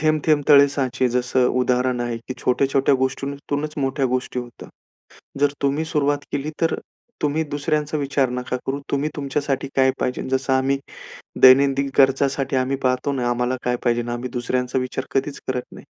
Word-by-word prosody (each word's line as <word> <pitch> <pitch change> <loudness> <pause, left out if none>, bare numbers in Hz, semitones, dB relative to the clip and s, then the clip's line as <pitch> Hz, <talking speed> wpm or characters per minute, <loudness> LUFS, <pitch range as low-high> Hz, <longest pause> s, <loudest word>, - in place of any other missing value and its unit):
थेंब-थेंब 155 -1 +2
तळे 140 -1 +8
साचे 130 -2 0
जसं 125 +1 +1
उदाहरण 125 0 +1
आहे, 120 -1 -2
की 125 +2 -8
छोट्या-छोट्या 135 +2 +2
गोष्टीतूनच 140 +3 -2
मोठ्या 135 0 0
गोष्टी 125 0 -2
होतात. 120 -1 -8 0.7
जर 145 0 +3
तुम्ही 140 +3 0
सुरुवात 145 -3 +1
केली 145 +2 -2
तर 165 -1 +2 0.5
तुम्ही 150 +2 +1
दुसऱ्यांचा 150 +1 -1
विचार 140 -2 0
नका 125 0 -3
करू. 140 +1 -2
तुम्ही 140 +2 0
तुमच्यासाठी 140 -1 -2
काय 130 0 +4
पाहिजे. 125 - -1
जसं 130 0 0
आम्ही 135 +1 +2 0.6
दैनंदिन 135 +1 +6
गरजासाठी 135 0 +2
आम्ही 130 +1 +1
पाहतो 130 +2 +1
ना, 125 -3 -1
आम्हाला 125 +1 0
काय 125 0 +1
पाहिजे, 120 -1 +1
आम्ही 120 +1 -4
दुसऱ्यांचा 125 +1 -1
विचार 130 +1 -4
कधीच 135 +1 -1
करत 125 -1 -1
नाही. - - -12
135 Hz, 160 wpm, -22 LUFS, 125-140 Hz, 0.7 s, तळे